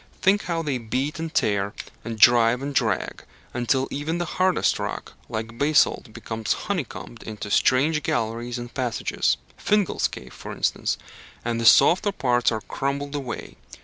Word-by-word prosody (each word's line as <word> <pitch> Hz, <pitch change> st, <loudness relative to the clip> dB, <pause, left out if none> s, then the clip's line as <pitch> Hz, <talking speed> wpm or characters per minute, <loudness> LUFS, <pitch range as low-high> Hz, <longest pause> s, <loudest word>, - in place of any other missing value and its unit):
Think 195 Hz, +2 st, +3 dB
how 165 Hz, -2 st, -1 dB
they 140 Hz, -5 st, -1 dB
beat 130 Hz, +7 st, -2 dB
and 165 Hz, -1 st, -4 dB
tear, 100 Hz, -5 st, 0 dB, 0.3 s
and 115 Hz, -1 st, -5 dB
drive 120 Hz, +2 st, +6 dB
and 140 Hz, +1 st, -3 dB
drag, -, -, 0 dB, 0.3 s
until 130 Hz, +2 st, +1 dB
even 150 Hz, +4 st, -2 dB
the 175 Hz, -, -1 dB
hardest 185 Hz, +2 st, +1 dB
rock, -, -, -5 dB, 0.2 s
like 115 Hz, +1 st, -5 dB
basalt, 145 Hz, -4 st, +3 dB
becomes 110 Hz, 0 st, -2 dB
honeycombed 145 Hz, -, -4 dB
into 105 Hz, -2 st, -7 dB
strange 150 Hz, +8 st, +3 dB
galleries 120 Hz, -5 st, -2 dB
and 120 Hz, 0 st, -7 dB
passages 125 Hz, -3 st, 0 dB, 0.2 s
Fingal's 210 Hz, -3 st, +1 dB
Cave, 65 Hz, 0 st, -10 dB
for -, -, -8 dB
instance -, -, 0 dB, 0.5 s
and 115 Hz, -1 st, -1 dB
the -, -, -1 dB
softer 185 Hz, -, +6 dB
parts 125 Hz, -8 st, +2 dB
are 110 Hz, -1 st, -2 dB
crumbled 140 Hz, +4 st, -3 dB
away. 135 Hz, -5 st, -5 dB
130 Hz, 150 wpm, -24 LUFS, 115-155 Hz, 0.5 s, drive